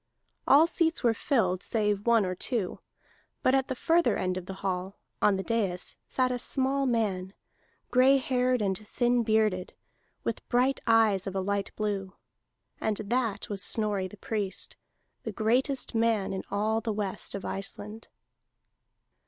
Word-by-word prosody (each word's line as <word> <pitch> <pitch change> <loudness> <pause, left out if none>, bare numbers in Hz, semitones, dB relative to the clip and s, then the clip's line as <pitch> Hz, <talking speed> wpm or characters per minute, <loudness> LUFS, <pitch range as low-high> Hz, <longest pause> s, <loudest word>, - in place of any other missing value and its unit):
All 290 +4 +7
seats 330 -2 +1
were 235 -2 +4
filled 195 -7 0
save 210 -2 0
one 230 -3 +4
or 185 - -2
two. 205 +1 -2 0.6
But 255 - +4
at 265 -1 +2
the 260 - -3
further 335 +7 +2
end 185 0 -1
of 185 -1 -6
the 190 - -6
hall, 190 +1 -2 0.2
on 205 - +4
the 190 - -3
dais, 200 -6 -1
sat 255 -1 +1
a 250 - -2
small 270 +2 +1
man, 200 -6 -1 0.6
gray 260 +2 +6
haired 250 -2 +1
and 190 -1 +1
thin 240 +2 +1
bearded, 215 -5 +1 0.5
with - - -4
bright 255 +3 +2
eyes 220 -4 +4
of 195 - -4
a - - +1
light 200 +1 -1
blue. 200 -3 -3 0.6
And 215 -2 -1
that 220 -1 -1
was 200 -2 -2
Snorri 205 0 +2
the 210 - -13
Priest, 200 -2 -3 0.5
the - - -5
greatest 250 +6 0
man 225 -4 +1
in 190 - -3
all 215 +3 0
the 225 - -2
west 205 -2 -3
of 200 - -6
Iceland. 205 +3 -5
215 Hz, 155 wpm, -28 LUFS, 195-245 Hz, 0.6 s, All